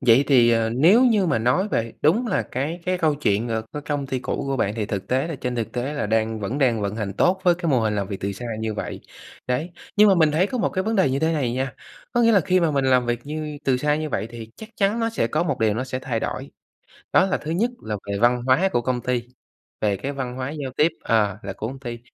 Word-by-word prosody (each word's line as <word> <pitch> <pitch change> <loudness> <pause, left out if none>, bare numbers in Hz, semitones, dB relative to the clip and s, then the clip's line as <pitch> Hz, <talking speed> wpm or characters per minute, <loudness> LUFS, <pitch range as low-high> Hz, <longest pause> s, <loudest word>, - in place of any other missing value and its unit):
Vậy 125 +2 +5
thì, 120 -4 +5
ờ, 115 -1 +2
nếu 175 - +5
như 215 -6 +3
mà 160 - +1
nói 125 - +1
về 115 - -1
đúng 205 +12 +3
là 195 - +1
cái 150 +7 -4
cái 185 0 +1
câu 155 -3 +2
chuyện, 115 -5 0
ờ, 110 -1 -1
cái 150 - -5
công 145 -2 -2
ty 130 -1 -2
cũ 125 - -3
của 135 -1 -1
bạn, 105 -3 0
thì 110 -3 -2
thực 100 -3 -4
tế 130 +4 +1
là 165 - -4
trên 125 -1 -3
thực 115 -2 -3
tế 130 +4 -2
là 145 - -1
đang 110 0 0
vẫn 115 +8 -3
đang 120 -6 +2
vận 100 +1 -2
hành 100 -3 -3
tốt 185 - +2
với 175 -1 +4
cái 170 -2 -2
mô 125 -3 +3
hình 110 -1 0
làm 100 -2 -1
việc 100 - -5
từ 100 +1 -2
xa 120 - -8 0.2
như 110 -1 -2
vậy. - - -5 0.5
Đấy, 125 +8 -1 0.3
nhưng 210 0 +7
mà 195 - +6
mình 160 -3 +4
thấy 170 +6 +2
có 250 +3 -4
một - - +1
cái 185 - -2
vấn 225 0 0
đề 185 -9 +3
như 135 - 0
thế 160 +2 +1
này 130 -6 0
nha, 130 0 -2 0.4
có 240 - +2
nghĩa 230 0 +5
là 200 - +5
khi 185 +2 +2
mà 165 -2 +2
mình 140 -2 0
làm 125 -2 +3
việc 120 0 -1
như 150 -1 -5
từ 130 -2 +3
xa 150 +3 +1
như 155 0 -3
vậy 110 -4 -2
thì 115 -1 -9
chắc 220 - -10
chắn 205 +3 +1
nó 230 0 0
sẽ 115 - 0
có 155 +8 0
một 145 -7 -1
điều 110 -2 +3
nó 130 +3 -2
sẽ 130 0 -4
thay 120 -4 -3
đổi. - - -4 0.6
Đó - - +6
là 190 - 0
thứ 155 - -6
nhất 225 +9 +1
là 105 -1 -3 0.2
về 100 - -1
văn 120 +1 +3
hóa 155 +10 +4
của 120 - +1
công 125 0 -1
ty, 125 -2 -1 0.6
về 100 -2 +1
cái 135 +8 -4
văn 130 -3 -4
hóa 130 +1 -3
giao 145 -4 -5
tiếp 155 +2 +4
ờ, 105 -3 +2
là 100 -1 -5
của 110 - -5
công 135 +1 -7
ty, 120 -3 -6
130 Hz, 285 wpm, -23 LUFS, 115-160 Hz, 0.6 s, nhưng